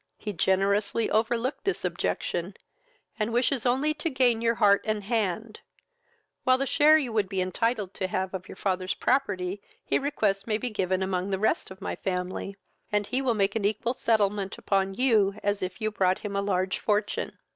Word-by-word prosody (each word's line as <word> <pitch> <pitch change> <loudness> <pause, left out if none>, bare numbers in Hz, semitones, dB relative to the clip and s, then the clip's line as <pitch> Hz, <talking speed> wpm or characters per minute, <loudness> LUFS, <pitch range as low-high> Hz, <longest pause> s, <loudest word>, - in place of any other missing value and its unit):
He 210 - -5
generously 200 +5 +1
overlooked 235 +5 0
this 390 - -1
objection, - - -2 0.6
and 215 +2 0
wishes 245 +1 +1
only 270 +5 +2
to 305 +2 -3
gain 250 -5 +2
your 230 0 +2
heart 200 -3 +4
and 215 -2 -1
hand; 215 0 -2 0.8
while 255 -1 +4
the 275 - 0
share 305 +3 +5
you 260 -7 -2
would 210 -4 +1
be 195 -2 -2
entitled 200 +2 -1
to 185 - -2
have 185 +1 -2
of 185 -1 -6
your - - -8
father's 185 -1 -1
property 200 -7 0 0.2
he - - +1
requests 215 -9 0
may 215 -2 +1
be 245 +2 -4
given 190 -2 0
among 190 0 -1
the 190 - 0
rest 215 - 0
of 190 +1 -12
my - - -3
family, 185 +1 -3 0.4
and 210 0 +1
he 255 +5 -1
will 250 -4 +1
make 200 0 +1
an 220 - -1
equal 215 +4 0
settlement 205 -5 0
upon 195 -1 0
you, 215 -5 +3
as 205 0 0
if 185 +1 -4
you 215 -1 -1
brought 190 -2 +2
him 200 -1 -3
a 200 - +1
large 190 -1 0
fortune. 210 0 -1
210 Hz, 190 wpm, -27 LUFS, 190-235 Hz, 0.8 s, share